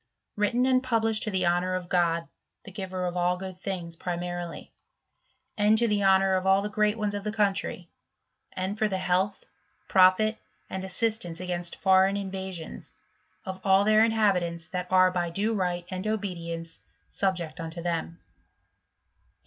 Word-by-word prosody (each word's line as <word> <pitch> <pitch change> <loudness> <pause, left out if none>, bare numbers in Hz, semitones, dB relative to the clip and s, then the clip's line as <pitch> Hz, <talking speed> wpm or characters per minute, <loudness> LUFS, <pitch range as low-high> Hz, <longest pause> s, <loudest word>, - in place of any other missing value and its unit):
Written 235 +4 +1
and 255 -1 +3
published 225 -4 +1
to 215 - -1
the 190 -3 0
honour 175 +1 +1
of 180 -1 -4
God, 170 -2 +1 0.4
the 195 - -11
giver 185 -2 -4
of 180 0 -3
all 180 0 +1
good 185 -1 -7
things, 175 -4 -4
pri 175 +1 -4
marily; 175 -1 -6 0.8
and 210 +1 +4
to 235 +1 +2
the 205 -2 +1
honour 190 0 +4
of 185 0 0
all 195 +1 +4
the 210 - -4
great 210 0 +1
ones 210 -2 -1
of 205 -1 -4
the 210 - -2
country; 200 -4 0 0.7
and 190 +3 -3
for 215 - +3
the 190 -2 -2
health, 185 +2 0 0.4
profit, 190 +4 +4 0.3
and 190 0 -4
assistance 190 -3 -1
igainst 175 -1 -3
foreign 190 +1 +4
invasions, 190 -4 -6 0.5
of 190 -1 -6
all 195 0 +5
their 215 +1 +5
inhabitants 185 -7 +1
that 180 -1 -3
Hi 185 0 +5
by 175 -1 -1
due 205 +6 0
right 180 -3 -1
and 185 +3 -4
obedience 170 -6 -4 0.3
subject 180 -4 -2
unto 165 +1 -6
them, 170 -1 -2
8. - - -37
190 Hz, 165 wpm, -27 LUFS, 175-205 Hz, 0.8 s, all